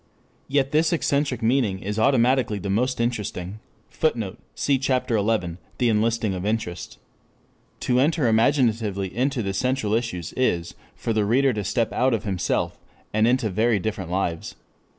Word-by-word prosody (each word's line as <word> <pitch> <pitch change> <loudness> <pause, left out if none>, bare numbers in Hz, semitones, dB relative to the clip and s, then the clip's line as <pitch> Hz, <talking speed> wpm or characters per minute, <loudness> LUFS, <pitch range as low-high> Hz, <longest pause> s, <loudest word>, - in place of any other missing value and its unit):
Yet 135 -1 +1
this 155 +1 +3
eccentric 140 -6 0
meaning 115 -5 +2
is 105 +3 -4
automatically 125 -2 +3
the 100 0 -3
most 125 +5 0
interesting. 105 -4 -3 0.3
[Footnote: 115 -11 -1 0.2
Cf. 135 -2 +1
Ch. 135 - -1 0.7
XI, - - -12 0.2
"The 120 -2 +2
Enlisting 110 -1 +1
of 90 -1 -4
Interest."] 105 -4 -3 0.8
To 125 0 +2
enter 150 -1 +2
imaginatively 110 -5 +1
into 130 0 0
the 100 -1 -2
central 125 0 0
issues 110 -8 -2
is 85 -10 0 0.2
for 115 - -2
the 110 -1 +2
reader 130 +5 +3
to 105 -1 -3
step 110 +4 0
out 130 -1 +2
of 110 - -4
himself, 95 -5 -1 0.3
and 110 +1 +3
into 120 -4 +1
very 110 +4 +2
different 100 -3 -3
lives. 90 -3 -2
115 Hz, 150 wpm, -24 LUFS, 100-130 Hz, 0.8 s, this